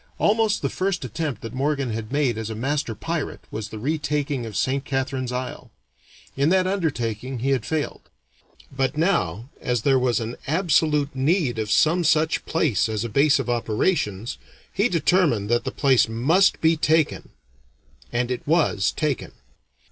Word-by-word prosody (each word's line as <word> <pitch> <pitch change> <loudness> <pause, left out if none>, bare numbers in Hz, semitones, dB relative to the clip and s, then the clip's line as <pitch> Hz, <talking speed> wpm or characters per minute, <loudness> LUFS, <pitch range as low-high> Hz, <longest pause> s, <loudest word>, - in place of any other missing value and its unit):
Almost 215 0 +2
the - - +1
first 185 -6 -2
attempt 130 -1 -4
that 115 - -6
Morgan 140 -1 -1
had 110 +1 -5
made 140 -5 +1
as 110 0 -4
a 110 - -4
master 135 0 -2
pirate 165 +6 -4
was 105 -1 -5
the 110 - -7
retaking 145 -1 -2
of 110 - -5
Saint 135 +1 0
Catharine's 135 -2 -2
Isle. 125 +1 -5 0.7
In 140 +3 +2
that 185 +1 +3
undertaking 130 - -2
he 130 +4 -1
had 135 - 0
failed; 155 -2 -3 0.7
but 135 +2 0
now, 125 - 0
as 120 -3 -1
there 135 -1 +4
was 125 -2 +1
an 115 +1 -5
absolute 155 -3 +2
need 135 - +1
of 110 -1 -2
some 170 +9 +3
such 155 0 +2
place 145 - +1
as 110 -1 -2
a 120 - -3
base 140 +6 +4
of - - -3
operations, 115 - -1 0.3
he 205 +6 +2
determined 165 - +2
that 120 - +2
the - - -2
place 130 -5 +3
must 155 +13 +3
be 160 0 +4
taken. 160 0 +1 0.8
And 120 +1 -1
it 125 - -2
was 150 - +2
taken. 150 -5 -2
135 Hz, 165 wpm, -23 LUFS, 120-160 Hz, 0.8 s, there